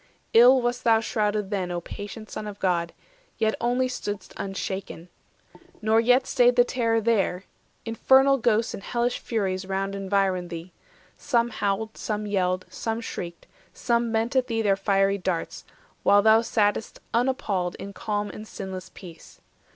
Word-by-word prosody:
Ill 245 +3 +8
wast 240 +1 -1
thou 225 -2 +5
shrouded 210 -2 -1
then, 190 -3 -1
O 175 0 -2
patient 205 +5 -8
Son 210 - -5
of 205 -1 -7
God, 175 -3 0 0.5
yet 220 -1 +1
only 245 +2 +1
stood'st 210 -5 -5
420 - - -5
Unshaken! 190 -3 -5 0.7
Nor 220 +1 +3
yet 250 +3 +4
staid 245 -1 +3
the 245 - +6
terror 230 -2 0
there: 205 -5 +1 0.4
Infernal 265 +4 +4
ghosts 230 -1 +1
and - - -7
hellish 240 +3 -1
furies 190 -4 -2
round 195 0 -2
Environed 195 -2 0
thee; 170 +1 -7 0.5
some 240 -4 +1
howled, 215 +1 -2
some 210 -1 -3
yelled, 185 -3 0
some 225 0 -3
shrieked, 170 -6 -7 0.3
Some 235 -1 0
bent 225 +3 0
at 260 -1 +2
thee 225 -1 -1
their 200 -2 +3
fiery 195 0 +1
darts, 180 -2 -3 0.4
while 205 0 +5
thou 220 +1 +6
Sat'st 215 -2 0 0.2
unappalled 210 -8 0
in 200 0 -8
calm 205 +1 -3
and 215 - -9
sinless 190 -2 -7
peace. 170 -4 -13
210 Hz, 155 wpm, -25 LUFS, 195-230 Hz, 0.7 s, Ill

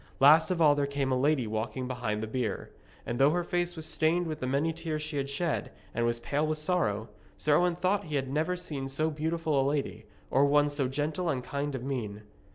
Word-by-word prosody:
Last 155 +4 +7
of 180 -2 0
all 150 -3 +6
there 145 -1 0
came 140 -1 -1
a - - +3
lady 135 0 +2
walking 110 +3 -3
behind 115 -4 -2
the - - -3
bier. 110 -3 -3 0.3
And 120 +1 -3
though 135 +1 +6
her 175 +3 0
face 175 0 -1
was 160 -2 -4
stained 160 +2 +1
with 155 -2 -4
the 130 - -2
many 145 +5 +1
tears 160 -2 -4
she 150 -1 -4
had 140 0 -2
shed, 160 +3 -1 0.2
and 120 0 +1
was 120 0 0
pale 145 +6 -1
with 155 0 0
sorrow, 150 - 0 0.3
Sir 150 -1 +3
Owen 175 0 +2
thought 185 +3 0
he 155 -2 -4
had 135 -1 0
never 155 +6 0
seen 150 -7 -4
so 155 +4 0
beautiful 155 -1 0
a 135 - +2
lady, 135 -7 -3 0.2
or 135 - +4
one 145 +1 +4
so 145 -2 0
gentle 150 +6 -1
and 130 -5 -1
kind 140 +2 -3
of 125 - -5
mien. 110 -6 -4
145 Hz, 230 wpm, -29 LUFS, 130-160 Hz, 0.3 s, Last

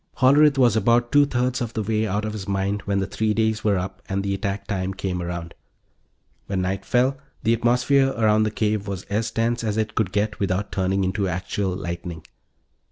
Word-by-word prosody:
Hollerith 140 +2 +5
was 120 -5 +4
about 120 +3 +2
two 145 0 +5
thirds 125 -1 0
of 115 -1 -3
the 110 - -2
way 110 +1 0
out 105 +2 -1
of 105 - -3
his 105 -2 -6
mind 100 +1 -1
when 100 -1 0
the 95 - 0
three 105 +3 -1
days 110 -1 +1
were 105 -2 +2
up 95 +1 -5
and 100 0 -1
the 100 0 -1
attack 100 +1 -3
time 95 -2 -2
came 95 -2 -3
around. 85 -1 -5 0.9
When 95 -2 -1
night 95 +1 -2
fell, 130 +4 +2 0.2
the 115 +1 +3
atmosphere 125 +4 +3
around 110 -1 +3
the 110 - +2
cave 105 -1 -1
was 95 -1 -4
as 110 +2 0
tense 115 +1 -1
as 110 -1 -1
it 110 -1 -1
could 105 -5 0
get 105 +1 -1
without 100 +1 -1
turning 95 +1 0
into 95 +1 0
actual 90 +2 -2
lightning. 85 -3 -5
105 Hz, 205 wpm, -23 LUFS, 95-115 Hz, 0.9 s, Hollerith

